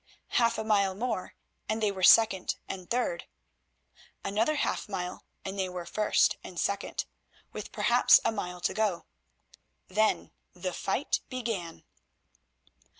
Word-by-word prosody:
Half 235 -1 +2
a 220 - -2
mile 200 -3 +2
more 220 -3 -3 0.3
and 215 +1 0
they 210 -2 +2
were 190 -1 -7
second 195 -1 +6
and 185 -2 -7
third; 250 - -1 1.0
another 220 +10 +1
half 290 - -1
mile 180 -3 -4 0.2
and 195 +1 -4
they 190 -1 0
were 180 -1 -6
first 210 +3 +2
and - - -7
second - - -1 0.5
with - - -7
perhaps - - +5
a - - +3
mile 180 -4 -5
to - - 0
go. 210 -6 0 0.8
Then 215 +3 +1 0.2
the 180 0 -4
fight 220 +12 -1
began. 225 -10 -4
200 Hz, 135 wpm, -29 LUFS, 185-225 Hz, 1.0 s, second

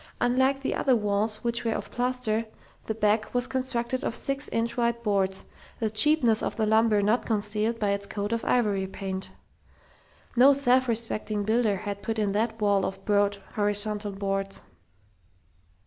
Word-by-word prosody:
Unlike 260 +3 +2
the 275 - -1
other 260 -3 +2
walls, 215 0 -1
which 235 +1 -1
were 225 -1 0
of - - -6
plaster, 245 -3 -1 0.4
the 220 - -3
back 215 0 +1
was 245 0 +2
constructed 255 -1 -2
of 230 - -2
six 275 +1 -2
inch 230 +1 -1
wide 235 -1 0
boards 195 -3 +1 0.3
the 220 -2 -2
cheapness 235 -1 +5
of - - -3
the 220 - 0
lumber 220 -1 +3
not 215 +4 +2
concealed 215 +1 0
by 210 -3 0
its 200 0 -2
coat 205 +1 -4
of 230 - -2
ivory 205 -6 +1
paint. 190 0 -5 1.1
No 260 +4 +7
self 260 -2 +3
respecting 215 -2 -1
builder 220 0 +1
had 200 +1 -5
put 225 +3 -3
in 210 -2 0
that 220 +2 -1
wall 205 -2 +2
of 195 - -5
broad, 205 -1 +2 0.2
horizontal 205 0 -1
boards.... 195 0 -3
220 Hz, 165 wpm, -26 LUFS, 205-240 Hz, 1.1 s, No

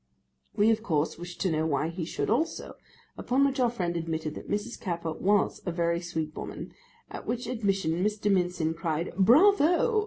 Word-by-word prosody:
We 210 +2 +4
of 220 0 +1
course 160 -6 -1
wished 175 0 -8
to 185 - +1
know 155 0 0
why 150 +1 0
he 165 0 -4
should - - -3
also, 290 +9 -1 0.5
upon 265 +3 +2
which 275 0 0
our 245 -2 +4
friend 180 -7 -2
admitted 160 -2 -3
that - - -9
Mrs. 210 +3 -3
Capper 170 -4 -3
was 200 +5 +1
a 180 - -2
very 170 0 0
sweet 160 -3 -4
woman, - - -7 0.4
at - - -8
which 240 0 -2
admission 195 -8 0
Mr. 210 0 0
Mincin 180 -4 +1
cried 165 0 -2
'Bravo! 345 - +5
180 Hz, 180 wpm, -28 LUFS, 165-225 Hz, 0.5 s, Bravo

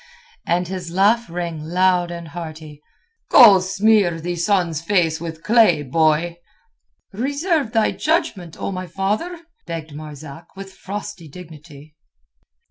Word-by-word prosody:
And 175 +1 0
his 180 -2 -6
laugh 210 +6 +2
rang 170 -2 -4
loud 180 +1 +1
and 170 -1 -7
hearty. 155 -3 -9 0.5
"Go 210 -6 +8
smear 195 -2 +2
the 175 +2 -4
sun's 170 -3 0
face 165 -3 +1
with 165 -1 -7
clay, 215 -9 +4
boy." 160 +4 +1 0.8
"Reserve 285 - -1
thy 220 -1 +2
judgment, 305 - -2
O - - -3
my 185 -1 -5
father," 210 - -3 0.3
begged 165 -3 -6
Marzak, 150 0 -10
with 195 0 -10
frosty 200 -3 -7
dignity. 155 -2 -13
175 Hz, 125 wpm, -20 LUFS, 160-205 Hz, 0.8 s, Go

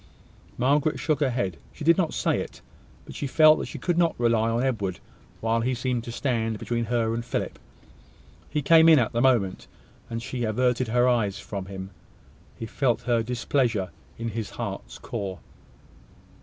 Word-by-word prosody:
Margaret 145 +4 +2
shook 155 -4 0
her 145 -3 +2
head. 120 -8 -2 0.2
She 155 - -8
did 170 +2 +6
not 165 -3 0
say - - +1
it, - - -7 0.4
but - - -10
she 145 - -3
felt 155 +3 +6
that - - -4
she - - -7
could 175 -1 0
not 170 -1 +2
rely 115 -1 +2
on 115 +2 0
Edward, 100 -9 -1 0.4
while 115 +1 +1
he 125 +2 0
seemed 120 -1 -1
to 120 - -5
stand 115 -3 -1
between 120 +2 -2
her 115 -1 0
and 115 +1 -2
Philip. 120 - -3 0.9
He 150 - -1
came 165 +2 +7
in 160 - +8
at 120 -5 +2
the 120 - 0
moment, 120 -8 +2 0.4
and 115 0 -3
she 120 +1 -4
averted 125 +3 +1
her 120 +2 +3
eyes 115 -6 +1
from 100 -2 -6
him. 95 0 -7 0.7
He 115 - -5
felt 120 +1 0
her 120 -2 +2
displeasure 120 -4 0 0.3
in 115 0 -3
his 110 -1 -4
heart's - - -6
core. 95 -3 -5
120 Hz, 180 wpm, -26 LUFS, 115-130 Hz, 0.9 s, in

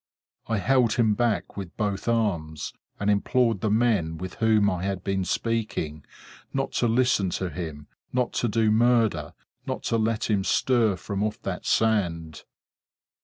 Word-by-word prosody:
I 115 - 0
held 120 +2 +3
him 110 -3 +3
back 115 0 -1
with 95 -4 -7
both 105 -1 -2
arms; 90 -10 -1 0.3
and 100 - -2
implored 110 +1 +2
the 110 - +1
men 105 -8 +1
with 95 +2 -6
whom 110 -2 +3
I 90 -3 0
had 95 -1 -3
been 95 0 -1
speaking, 100 -10 -2 0.5
not 135 0 -2
to 120 - +3
listen 115 -5 +2
to 95 -2 -3
him, 80 -5 -6 0.3
not 125 -1 0
to 120 - +1
do 110 0 +2
murder, 110 -9 +2 0.3
not - - -3
to 115 - 0
let 110 0 0
him 100 -3 +1
stir 115 -1 +2
from 100 +1 -4
off 110 0 -2
that 95 -2 -4
sand! 85 -8 0
105 Hz, 160 wpm, -26 LUFS, 95-115 Hz, 0.5 s, held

